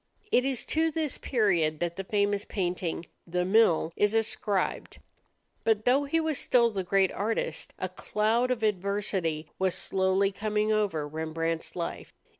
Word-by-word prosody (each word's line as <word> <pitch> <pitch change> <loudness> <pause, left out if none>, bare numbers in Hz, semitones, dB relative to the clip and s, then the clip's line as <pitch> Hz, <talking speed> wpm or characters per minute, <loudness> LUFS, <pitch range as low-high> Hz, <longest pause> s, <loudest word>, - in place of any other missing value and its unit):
It 250 - +4
is 265 -2 -1
to 320 +1 +1
this 315 -2 -2
period 175 - +1
that 175 -1 -2
the 195 - -4
famous 205 0 0
painting, 175 -3 -3 0.2
"The 180 +1 -1
Mill," 185 -5 +3
is 205 +1 +2
ascribed. 210 -3 -1 0.7
But 220 -1 +1
though 270 +3 +3
he 325 +4 +1
was 315 -3 0
still 235 -2 +3
the 195 -3 -2
great 190 +1 +2
artist, 220 +3 -2
a - - -2
cloud 225 +4 0
of 245 -3 -1
adversity 190 -6 -1
was 190 -1 +1
slowly 190 +1 +1
coming 215 +1 -1
over 200 -9 0
Rembrandt's 160 +1 -3
life. 170 -2 -5
200 Hz, 150 wpm, -28 LUFS, 175-225 Hz, 0.7 s, It